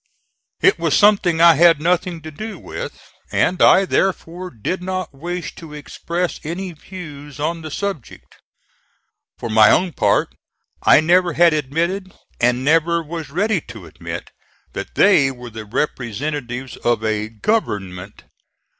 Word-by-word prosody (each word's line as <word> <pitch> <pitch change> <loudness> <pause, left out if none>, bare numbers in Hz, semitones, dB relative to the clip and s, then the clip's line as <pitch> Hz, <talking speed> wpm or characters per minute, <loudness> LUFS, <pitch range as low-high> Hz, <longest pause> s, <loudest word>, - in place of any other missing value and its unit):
It - - +4
was - - +2
something 195 -6 +4
I 170 0 +8
had 165 0 +5
nothing 175 +1 0
to 155 - -8
do 215 +8 -7
with, - - -7 0.3
and 180 - +1
I 195 - +6
therefore 185 -1 -1
did 130 - -4
not 185 -3 -4
wish 175 +5 -5
to 155 -3 -10
express 170 +4 -4
any 180 +4 -4
views 150 -4 -10
on 165 +3 -2
the 155 - -7
subject. 195 - -6 1.0
For - - -5
my 110 -1 +6
own 180 0 +2
part - - +1 0.5
I - - +6
never 175 +1 +3
had 170 +1 +5
admitted, 170 +7 -2 0.3
and 125 +2 +1
never 165 +2 +2
was 160 -2 -6
ready 195 +4 0
to 105 -6 -10
admit, 80 - -8 0.4
that - - -7
they 170 -9 +5
were 125 -2 -9
the 110 0 -8
representatives 125 +2 -3
of 120 -2 0
a 110 0 -1
GOVERNMENT. 105 - -3
160 Hz, 140 wpm, -20 LUFS, 130-180 Hz, 1.0 s, I